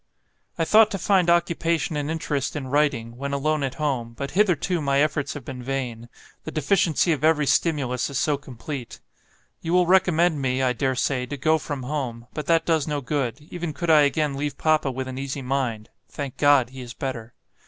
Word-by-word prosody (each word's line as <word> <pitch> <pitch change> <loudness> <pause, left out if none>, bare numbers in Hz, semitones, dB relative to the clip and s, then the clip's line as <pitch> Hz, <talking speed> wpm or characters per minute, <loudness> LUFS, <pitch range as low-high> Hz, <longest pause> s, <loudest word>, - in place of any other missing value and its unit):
"I 165 - +1
thought 215 +5 +6
to 195 - -3
find 185 -1 +2
occupation 170 -3 +1
and 145 0 -2
interest 150 -4 -2
in 135 -3 -4
writing, 130 -5 0
when 140 +2 -4
alone 155 +2 0
at 135 -2 -2
home, 130 -6 -2
but 140 0 -4
hitherto 180 -3 +1
my 140 -1 +1
efforts 145 -1 0
have 140 -5 -8
been 130 -1 -7
vain; 125 -3 -4 0.3
the - - -6
deficiency 165 +2 +2
of 150 -3 -1
every 155 -2 +3
stimulus 140 -5 +1
is 140 - -3
so 150 0 +2
complete. 135 -1 -8 0.6
You 165 - -2
will 180 0 +5
recommend 175 -4 +3
me, 130 0 0
I 125 -1 +2
dare 130 +2 0
say, 125 0 -1
to 145 +3 -5
go 155 +4 +2
from 145 -3 -5
home; 125 -4 -4
but 150 -2 -5
that 165 -1 +3
does 160 -3 +1
no 150 -1 -1
good, 125 -2 -2
even 175 -3 -4
could 170 +2 0
I 155 -1 +7
again 145 +1 +1
leave 145 +1 -3
Papa 155 -3 +2
with 130 0 -4
an 130 0 -5
easy 135 0 -4
mind 125 -5 -2 0.2
(thank 140 -3 -6
God! 140 -4 +4
he 130 0 -9
is 120 -1 -9
better). 120 -4 -5
145 Hz, 200 wpm, -24 LUFS, 130-160 Hz, 0.6 s, I